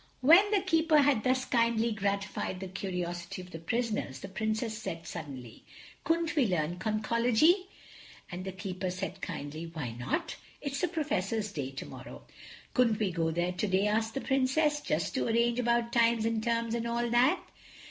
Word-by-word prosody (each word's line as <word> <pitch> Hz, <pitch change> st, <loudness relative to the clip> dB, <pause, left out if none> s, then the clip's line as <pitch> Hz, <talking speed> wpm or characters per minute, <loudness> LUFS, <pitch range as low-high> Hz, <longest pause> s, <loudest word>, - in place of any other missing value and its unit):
When 340 Hz, +10 st, +7 dB
the 410 Hz, -2 st, +2 dB
Keeper 325 Hz, -4 st, +3 dB
had 280 Hz, -6 st, +4 dB
thus 255 Hz, 0 st, +1 dB
kindly 230 Hz, -1 st, +2 dB
gratified 200 Hz, -2 st, -2 dB
the 190 Hz, -, -5 dB
curiosity 180 Hz, -2 st, -4 dB
of 180 Hz, -, -14 dB
the 165 Hz, -, -7 dB
prisoners 210 Hz, -, -2 dB
the 195 Hz, -, -7 dB
Princess 220 Hz, +3 st, -2 dB
said 170 Hz, -7 st, -6 dB
suddenly: 130 Hz, -6 st, -8 dB, 0.4 s
"Couldn't 330 Hz, 0 st, 0 dB
we 275 Hz, -6 st, +3 dB
learn 175 Hz, -1 st, -1 dB
Conchology?" 235 Hz, -, +2 dB, 0.6 s
And 175 Hz, +1 st, -5 dB
the 190 Hz, -, -4 dB
Keeper 190 Hz, -1 st, -4 dB
said 190 Hz, +1 st, -5 dB
kindly, 155 Hz, -1 st, -5 dB
"Why 150 Hz, -8 st, -4 dB
not? 120 Hz, +3 st, -3 dB, 0.2 s
It's 280 Hz, -1 st, -3 dB
the 360 Hz, -, +2 dB
Professor's 225 Hz, -, -1 dB
day 140 Hz, -8 st, -3 dB
tomorrow." 135 Hz, 0 st, -9 dB, 0.5 s
"Couldn't 235 Hz, -4 st, +3 dB
we 210 Hz, -3 st, 0 dB
go 165 Hz, -1 st, 0 dB
there 175 Hz, +2 st, 0 dB
today?" 190 Hz, +1 st, +1 dB
asked 220 Hz, +1 st, 0 dB
the 270 Hz, -, -1 dB
Princess, 290 Hz, +3 st, +2 dB
"just -, -, -1 dB
to 260 Hz, -, 0 dB
arrange 235 Hz, +1 st, +2 dB
about 235 Hz, -1 st, +1 dB
times 230 Hz, -1 st, +3 dB
and 225 Hz, -1 st, 0 dB
terms 230 Hz, 0 st, 0 dB
and 235 Hz, 0 st, -1 dB
all 235 Hz, +1 st, 0 dB
that?" 245 Hz, +4 st, +4 dB
220 Hz, 170 wpm, -30 LUFS, 185-250 Hz, 0.6 s, When